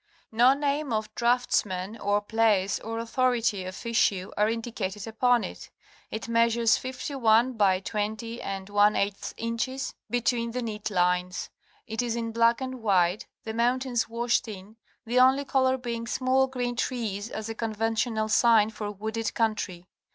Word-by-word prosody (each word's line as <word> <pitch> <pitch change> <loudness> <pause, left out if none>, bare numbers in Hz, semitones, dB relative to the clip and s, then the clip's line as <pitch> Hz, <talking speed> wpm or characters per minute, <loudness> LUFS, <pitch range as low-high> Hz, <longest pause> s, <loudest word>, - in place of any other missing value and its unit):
No 240 +4 +5
name 285 -1 -1
of 215 -1 -2
draughtsman 225 -5 0
or 205 0 +1
place 205 -3 +2
or 225 0 -5
authority 230 -4 0
of 185 +5 -8
issue 200 -5 +1
are 210 +1 +2
indicated 220 -4 -4
upon 240 +1 +2
it. - - -8 0.4
It 220 - -5
measures 230 0 +3
51 255 -2 +1
by 195 -4 +2
204 205 -1 0 0.3
inches 235 +4 -3 0.2
between 240 -1 0
the 250 0 -2
neat 215 -2 -4
lines. 180 -1 0 0.3
It 225 0 -2
is 235 -2 -2
in 230 -1 -3
black 230 +2 +3
and 260 -1 -5
white, 190 -2 +2 0.2
the 220 - -5
mountains 245 +1 0
washed 235 +1 0
in, 205 0 -9 0.3
the 240 +2 +2
only 265 +2 +5
color 260 -1 +2
being 235 -2 -4
small 260 +2 +2
green 245 -2 -3
trees 225 -4 -2
as 220 -2 -5
a 225 - -4
conventional 225 0 -1
sign 220 -1 +4
for 210 -1 -5
wooded 220 +2 -4
country. 205 -6 -1
225 Hz, 145 wpm, -27 LUFS, 210-245 Hz, 0.4 s, No